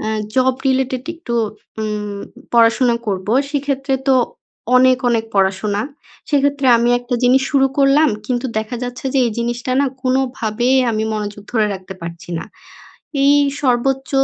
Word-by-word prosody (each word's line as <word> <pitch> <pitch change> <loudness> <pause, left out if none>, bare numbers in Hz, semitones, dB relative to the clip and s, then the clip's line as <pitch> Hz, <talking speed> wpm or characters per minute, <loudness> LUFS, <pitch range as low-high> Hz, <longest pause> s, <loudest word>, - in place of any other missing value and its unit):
অ্যা 215 - -3 0.3
job 260 0 +3
related 260 -1 0
একটু 325 -8 -6 0.5
উম 210 -1 -3 0.4
পড়াশোনা 235 +1 +4
করবো। 195 +1 -2 0.2
সেক্ষেত্রে 275 -1 -1
তো 265 - +5 0.6
অনেক, 255 0 +5
অনেক 225 -1 +1
পড়াশোনা। 195 +2 +1 0.5
সেক্ষেত্রে 285 -1 +1
আমি 235 - +2
একটা 245 +1 -4
জিনিস 260 +2 +4
শুরু 270 -1 +4
করলাম 280 +3 +5 0.2
কিন্তু 250 +1 -1
দেখা 220 +3 -4
যাচ্ছে 245 +1 -7
যে 270 - +3
এই 230 - -2
জিনিসটা 240 +2 -2
না 280 - +2 0.2
কোনোভাবেই 255 -1 +1
আমি 215 0 -1
মনোযোগ 205 -1 -5
ধরে 220 -3 +2
রাখতে 190 0 -9
পারছি 170 0 -8
না। - - -6 0.8
এই 285 +1 +6 0.3
সর্বোচ্চ 265 +1 +1
245 Hz, 145 wpm, -18 LUFS, 215-265 Hz, 0.8 s, এই